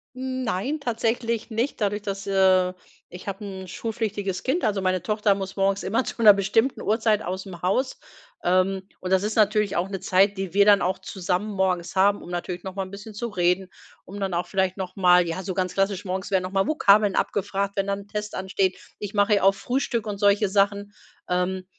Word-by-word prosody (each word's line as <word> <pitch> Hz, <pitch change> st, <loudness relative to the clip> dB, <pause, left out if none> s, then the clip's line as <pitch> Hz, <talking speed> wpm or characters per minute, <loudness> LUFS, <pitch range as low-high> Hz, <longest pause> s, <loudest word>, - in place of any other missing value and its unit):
Nein, 260 Hz, +1 st, -2 dB
tatsächlich 230 Hz, -2 st, -2 dB
nicht 235 Hz, +5 st, -1 dB
dadurch 205 Hz, 0 st, 0 dB
dass, 200 Hz, -1 st, -5 dB
äh 190 Hz, -2 st, +3 dB, 0.4 s
ich 180 Hz, +3 st, -10 dB
habe 200 Hz, +2 st, -5 dB
'n 190 Hz, -2 st, -7 dB
schulpflichtiges 205 Hz, -2 st, -3 dB
Kind, 300 Hz, +8 st, 0 dB
also 205 Hz, -2 st, +1 dB
meine 185 Hz, -1 st, +1 dB
Tochter 210 Hz, 0 st, +1 dB
muss 195 Hz, -1 st, -6 dB
morgens 195 Hz, 0 st, +1 dB
immer 225 Hz, +7 st, 0 dB
zu -, -, -7 dB
'ner 210 Hz, -2 st, +9 dB
bestimmten 215 Hz, +6 st, +1 dB
Uhrzeit 220 Hz, -1 st, +1 dB
ausm 185 Hz, -1 st, -6 dB
Haus. 255 Hz, +9 st, 0 dB, 0.4 s
Ähm, 185 Hz, +1 st, +2 dB, 0.2 s
und 185 Hz, 0 st, -5 dB
das 190 Hz, 0 st, +4 dB
ist 215 Hz, +1 st, -2 dB
natürlich 210 Hz, -1 st, +2 dB
auch 175 Hz, +2 st, 0 dB
'ne 195 Hz, -2 st, -4 dB
Zeit, 190 Hz, +2 st, +2 dB
die 190 Hz, -2 st, -4 dB
wir 200 Hz, 0 st, +5 dB
dann 205 Hz, -1 st, +6 dB
auch 185 Hz, +1 st, 0 dB
zusammen 190 Hz, +2 st, -3 dB
morgens 185 Hz, -2 st, -1 dB
haben, 200 Hz, +2 st, +3 dB
um -, -, -10 dB
natürlich 175 Hz, 0 st, -4 dB
noch 190 Hz, -1 st, -7 dB
mal 195 Hz, -, -2 dB
'n 185 Hz, -, -10 dB
bisschen 205 Hz, +2 st, -9 dB
zu 235 Hz, +2 st, -3 dB
reden, 180 Hz, -2 st, +1 dB, 0.4 s
um 200 Hz, +3 st, -9 dB
dann 195 Hz, -2 st, -2 dB
auch 175 Hz, -, -1 dB
vielleicht 190 Hz, 0 st, 0 dB
noch 185 Hz, -1 st, -5 dB
mal 180 Hz, -2 st, +5 dB
ja, 165 Hz, +3 st, -3 dB
so 185 Hz, -, -3 dB
ganz 185 Hz, -1 st, -1 dB
klassisch, 195 Hz, 0 st, 0 dB
morgens 190 Hz, +1 st, -3 dB
werden 185 Hz, -1 st, +2 dB
noch 185 Hz, -, -5 dB
mal 195 Hz, 0 st, +1 dB
Vokabeln 205 Hz, -9 st, +4 dB
abgefragt, 200 Hz, 0 st, -1 dB
wenn 195 Hz, 0 st, -1 dB
dann 200 Hz, 0 st, -1 dB
'n 200 Hz, -, -16 dB
Test 210 Hz, 0 st, -5 dB
ansteht. 190 Hz, 0 st, -1 dB, 0.2 s
Ich 205 Hz, 0 st, -6 dB
mache 205 Hz, 0 st, +3 dB
ja 200 Hz, -, 0 dB
auch 195 Hz, 0 st, +5 dB
Frühstück 245 Hz, -2 st, -2 dB
und 205 Hz, -1 st, -3 dB
solche 205 Hz, 0 st, +3 dB
Sachen. 200 Hz, +1 st, +1 dB, 0.4 s
Ähm, 185 Hz, +1 st, -1 dB
195 Hz, 210 wpm, -24 LUFS, 185-210 Hz, 0.4 s, ner